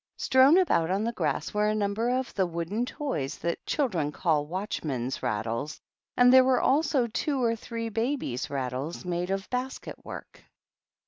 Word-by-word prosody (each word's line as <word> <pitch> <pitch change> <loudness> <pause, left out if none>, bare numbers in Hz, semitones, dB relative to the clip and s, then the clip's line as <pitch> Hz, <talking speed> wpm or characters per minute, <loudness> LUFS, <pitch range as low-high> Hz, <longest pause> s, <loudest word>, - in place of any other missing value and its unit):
Strown 265 +6 +5
about 175 - +3
on 195 +3 0
the 230 - 0
grass 235 - -2
were 210 0 +2
a 215 - +1
number 215 +3 0
of 255 0 -1
the 190 -2 +1
wooden 175 +8 -2
toys 205 - -3
that 170 0 -3
children 180 - 0
call 150 -2 0
watchmen'^ 150 - -3
rattles, 115 +7 -2 0.4
and 250 0 +6
there 260 0 +9
were 255 -1 +3
also 280 -2 +2
two 260 +4 -1
or 230 -1 +2
three 230 +1 -5
babies 225 - -2
rattles 135 +5 -4
made 175 0 -2
of 195 0 -2
basket 255 +1 -4
work. - - -10
210 Hz, 165 wpm, -28 LUFS, 160-250 Hz, 0.4 s, there